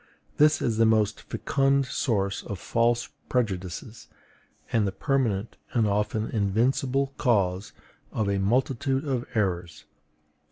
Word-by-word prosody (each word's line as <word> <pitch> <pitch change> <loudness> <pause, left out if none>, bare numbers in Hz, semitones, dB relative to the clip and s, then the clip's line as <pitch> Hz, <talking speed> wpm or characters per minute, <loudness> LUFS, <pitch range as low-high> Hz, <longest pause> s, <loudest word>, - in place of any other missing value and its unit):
This 150 +1 +4
is 115 -2 0
the 115 - +6
most 110 -1 +2
fecund 135 0 +1
source 100 -6 -1
of 100 - -6
false 115 +5 +1 0.2
prejudices, 105 -1 -3 0.7
and 110 -3 +3
the - - -1
permanent 115 -5 -1 0.2
and 115 -3 +3
often 105 +2 0
invincible 125 +6 +1
cause 100 -6 +1 0.4
of 110 - -1
a 100 0 +1
multitude 130 +6 +1
of 130 -3 -2
errors. 90 -6 -1
110 Hz, 120 wpm, -26 LUFS, 100-130 Hz, 0.7 s, the